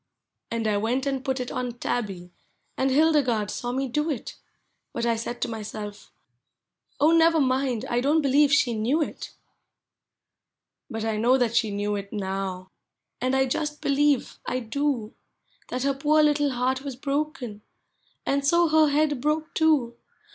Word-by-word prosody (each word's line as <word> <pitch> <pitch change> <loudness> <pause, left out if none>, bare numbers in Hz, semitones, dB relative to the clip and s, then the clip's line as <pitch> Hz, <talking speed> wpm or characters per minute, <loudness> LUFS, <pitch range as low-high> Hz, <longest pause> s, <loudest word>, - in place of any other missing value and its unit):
And 230 -1 -2
1 205 -1 +1
went 250 +5 0
and 270 -2 -2
put 265 -1 -1
it 250 0 -4
on 250 -1 -3
Tabby, 195 -7 -4 0.4
and 265 - +1
Hildegarde 265 -7 +2
saw 245 - -3
me 265 +2 -1
do 300 +6 -1
it; 275 -7 -4 0.6
I5ut 235 - -1
I 235 -1 +2
said 235 +2 -5
to - - +1
myself, 215 -2 -7 0.9
"Oh, 305 +3 +5
never 330 0 +5
mind, 260 -3 0
I 240 -2 0
don't 300 +4 +2
be 275 - +1
lieve 285 +1 +4
she 280 -4 +3
knew 245 +9 +1
it! - - -8 0.7
" - - -31
Hut 225 0 -3
I 220 -1 -1
know 245 +4 +4
that 235 -3 0
she 225 -2 +3
knew 205 +1 -2
it 200 0 -7
now, 190 -2 -4 0.5
and 255 +1 +1
I 265 0 +3
just 295 +3 -2
be - - -3
lieve, 280 -1 +2
I 255 - -1
do. 245 -1 -2 0.5
That 250 0 -3
her 275 0 +2
poor 300 +3 +3
little 295 -1 +3
heart 260 +1 0
was 275 -2 -6
broken, 275 -5 -3 0.6
and 280 0 +1
so 340 +3 +3
her 310 0 +5
head 290 -2 +1
broke 305 +2 -1
too. 290 -8 +2
260 Hz, 170 wpm, -25 LUFS, 225-290 Hz, 0.9 s, Oh